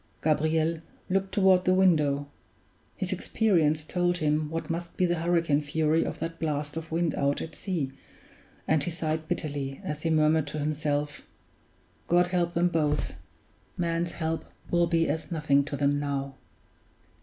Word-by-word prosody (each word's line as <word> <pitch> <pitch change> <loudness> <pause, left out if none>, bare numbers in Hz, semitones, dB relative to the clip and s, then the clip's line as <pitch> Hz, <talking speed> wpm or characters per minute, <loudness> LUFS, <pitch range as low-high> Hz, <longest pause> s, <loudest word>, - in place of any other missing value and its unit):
Gabriel 160 +1 +1 0.3
looked 195 0 +1
toward 190 -2 +4
the 185 0 +3
window; 150 -7 +3 0.7
his - - -1
experience 160 -8 +2
told 175 +2 0
him 150 -1 +1
what 165 +1 -4
must 170 +1 -4
be 185 - +3
the 175 -1 0
hurricane 165 -3 +2
fury 155 +2 +1
of - - -4
that 165 0 -5
blast 150 -2 -2
of 165 0 -6
wind 165 0 +1
out 140 0 0
at 160 - -6
sea, 165 -9 -3 0.8
and 155 -2 +3
he - - -1
sighed 160 -1 -2
bitterly 145 -5 -3
as 150 0 -4
he 165 - 0
murmured 155 -1 +3
to 150 - -4
himself, 150 0 -2 0.8
"God 175 +1 +4
help 175 -1 -1
them 175 +1 +3
both 150 -3 0 0.6
man's 170 0 -1
help 160 0 -2 0.3
will 175 0 +3
be 165 -1 +2
as 160 +4 -3
nothing 150 -3 +3
to 145 - -4
them 145 0 +2
now!" 140 -1 -2
160 Hz, 155 wpm, -28 LUFS, 150-170 Hz, 0.8 s, toward